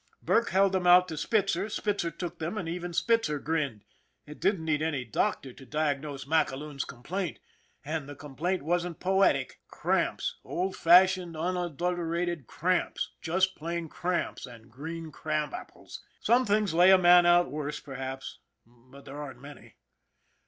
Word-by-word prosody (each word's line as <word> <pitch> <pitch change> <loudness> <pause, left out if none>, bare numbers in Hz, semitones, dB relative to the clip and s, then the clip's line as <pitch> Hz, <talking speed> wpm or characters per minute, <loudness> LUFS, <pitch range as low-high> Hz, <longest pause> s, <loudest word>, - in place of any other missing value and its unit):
Burke 230 - +2
held 195 0 +3
them 185 -2 0
out 180 +1 +7
to 160 - -5
Spitzer, 195 +3 0
Spitzer 205 -5 -1
took 170 +1 -7
them, 170 +7 -3
and 180 - -3
even 175 +1 -4
Spitzer 225 -4 +1
grinned. 145 -8 -2 0.4
It 150 0 -11
didn't 190 -5 +1
need 155 -2 +1
any 150 -5 -1
doctor 125 +4 -1
to 135 - -14
diagnose 145 -1 -2
MacAloon's 150 -2 -1
complaint 165 +8 -5 0.5
and 150 -1 -4
the 145 - -8
complaint 150 +5 -3
wasn't 175 +1 -1
poetic! 185 -8 +1
Cramps, - - -1
old 185 +2 -2
fashioned, 180 -1 +5
un 175 +3 -1
adulterated 175 -2 -2
cramps 180 +2 -1
just 185 +3 +1
plain 170 +1 -4
cramps 175 -5 -2
and 115 -1 -14
green 160 +5 -7
crab 155 0 -2
apples! - - -9 0.2
Some 245 +1 +3
things 205 -3 +2
lay 175 +3 +6
a 190 - +8
man 175 -1 +6
out 175 0 +4
worse 150 0 -4
perhaps 135 -1 -7 0.3
but 125 +4 -18
there 145 +2 -7
aren't 135 -4 -8
many. 140 0 -13
165 Hz, 150 wpm, -29 LUFS, 145-180 Hz, 0.5 s, a